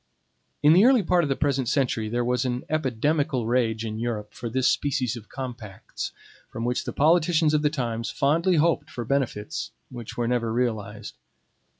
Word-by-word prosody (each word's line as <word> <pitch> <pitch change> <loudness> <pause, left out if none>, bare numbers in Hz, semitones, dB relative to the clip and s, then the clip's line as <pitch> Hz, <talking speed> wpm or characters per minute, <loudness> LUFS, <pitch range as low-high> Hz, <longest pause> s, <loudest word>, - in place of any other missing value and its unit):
In 150 +2 +7
the 185 +4 +6
early 255 -4 +5
part 175 0 +3
of 145 - -1
the 135 - +1
present 135 -4 0
century 120 -6 0
there 120 +2 -1
was 125 +1 +1
an 125 -1 -2
epidemical 140 -2 0
rage 115 -2 0
in 110 0 -4
Europe 115 -3 -3
for 120 - -5
this 130 +2 +1
species 130 -4 0
of 115 -2 -11
compacts, 120 -7 -6 0.4
from 115 - -5
which 125 0 -1
the - - -3
politicians 160 0 +3
of 150 - +3
the 150 - +3
times 115 -5 -3
fondly 165 +6 +2
hoped 160 -1 +2
for 120 -4 -6
benefits 110 - -2 0.2
which 120 -3 -8
were 120 -1 0
never 120 -2 0
realized. 115 -3 -2
125 Hz, 180 wpm, -25 LUFS, 115-150 Hz, 0.4 s, In